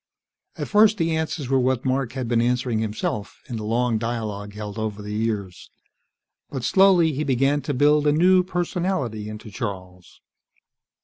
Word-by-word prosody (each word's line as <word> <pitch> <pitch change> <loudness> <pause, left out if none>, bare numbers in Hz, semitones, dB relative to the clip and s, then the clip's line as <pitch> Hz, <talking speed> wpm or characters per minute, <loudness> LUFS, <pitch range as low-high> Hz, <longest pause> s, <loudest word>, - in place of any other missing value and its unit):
At - - -4
first 215 0 +5
the 165 -2 0
answers 160 -3 -3
were 135 +1 +2
what 130 0 0
Mark 130 -2 0
had 130 -3 -3
been 115 0 +2
answering 125 -1 0
himself, 105 -1 -3
in 120 -4 -5
the 110 - -5
long 115 +1 0
dialogue 105 -3 -4
held 105 0 -6
over 110 -1 -3
the 105 0 -6
years. 105 -4 -3 0.8
But, 135 -4 -5
slowly, 185 -3 +4
he 145 +3 -2
began 135 +1 +1
to 145 - -3
build 150 +2 +3
a - - +5
new 180 +4 +5
personality 175 - -2
into 105 0 -9
Charles. 95 -6 -7
125 Hz, 165 wpm, -23 LUFS, 110-150 Hz, 0.8 s, first